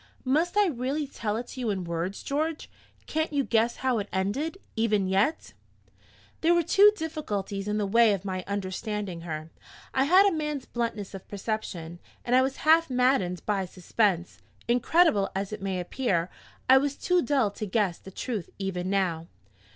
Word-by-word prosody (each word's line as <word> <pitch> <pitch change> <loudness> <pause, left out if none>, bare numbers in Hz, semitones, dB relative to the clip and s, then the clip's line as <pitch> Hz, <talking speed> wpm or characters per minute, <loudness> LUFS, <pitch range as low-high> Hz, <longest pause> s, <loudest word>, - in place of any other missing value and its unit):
"Must 315 +9 +1
I 415 - +6
really 285 -1 -1
tell 220 -6 -3
it 240 - -4
to - - -8
you 240 -3 -1
in 195 -3 -1
words, 170 +3 -3
George? 310 +3 -2 0.3
Can't 315 0 -1
you 285 -2 +1
guess 230 -1 +2
how 250 -3 +2
it 205 - -5
ended, 235 - -1 0.2
even 215 -3 +2
yet?" 200 +12 0 0.9
There 335 +2 +4
were 345 - +3
two 405 +6 +6
difficulties 210 - -4
in 210 0 0
the 210 - 0
way 230 +2 +5
of 195 -1 -4
my 185 -1 -3
understanding 200 -1 -3
her. 160 -1 -6 0.4
I 265 0 +3
had 370 +6 +6
a 400 - +4
man's 300 -4 -3
bluntness 230 -5 -3
of 195 - -9
perception, 190 -5 -4 0.3
and 245 - +2
I 255 - +6
was 265 +1 -1
half 325 0 +5
maddened 250 - +1
by 200 -3 0
suspense. 180 0 -1 0.3
Incredible 240 - +3
as 195 +2 -3
it 210 - -6
may 190 -1 -2
appear, 180 -2 -1 0.4
I 265 +1 +8
was 280 0 -1
too 360 +3 +2
dull 270 -10 +1
to 210 +1 -5
guess 195 -3 0
the - - -11
truth 205 -1 -4
even 185 -2 -3
now. 175 -4 0
215 Hz, 175 wpm, -27 LUFS, 190-275 Hz, 0.9 s, I